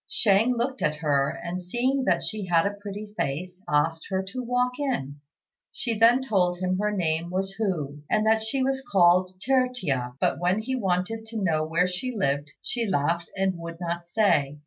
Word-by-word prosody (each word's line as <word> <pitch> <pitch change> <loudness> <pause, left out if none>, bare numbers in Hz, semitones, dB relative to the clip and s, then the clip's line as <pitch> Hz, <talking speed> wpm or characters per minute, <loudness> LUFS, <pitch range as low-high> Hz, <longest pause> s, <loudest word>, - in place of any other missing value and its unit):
Shang 225 +4 +3
looked 260 +3 -2
at 150 - +1
her, 145 -2 +1
and 175 +3 -5
seeing 255 +8 0
that - - +2
she 210 -3 -3
had 170 0 +3
a 200 - 0
pretty 205 +1 -8
face, 180 +4 -3
asked 160 +2 +1
her 190 0 0
to 255 +5 -4
walk 250 +2 0
in. 145 - -2 0.5
She 235 -3 -2
then 235 +4 +5
told 185 -7 +1
him 185 +1 -1
her 210 0 +1
name 170 -4 -1
was 190 +2 -2
Hu, 150 -9 -2
and 215 0 +2
that 220 0 +4
she 240 +5 -1
was 265 0 0
called 185 -3 +3
Tertia; 220 - 0
but - - +1
when 180 +4 +1
he 260 +3 -2
wanted 210 +1 -1
to 225 0 -6
know 155 -4 +2
where 165 +3 +1
she 185 +8 -3
lived, 145 -5 0
she 235 -2 -1
laughed 170 -1 0
and 190 -2 0
would 170 0 -7
not 170 -1 -4
say. 150 -8 +2
190 Hz, 190 wpm, -26 LUFS, 170-225 Hz, 0.5 s, then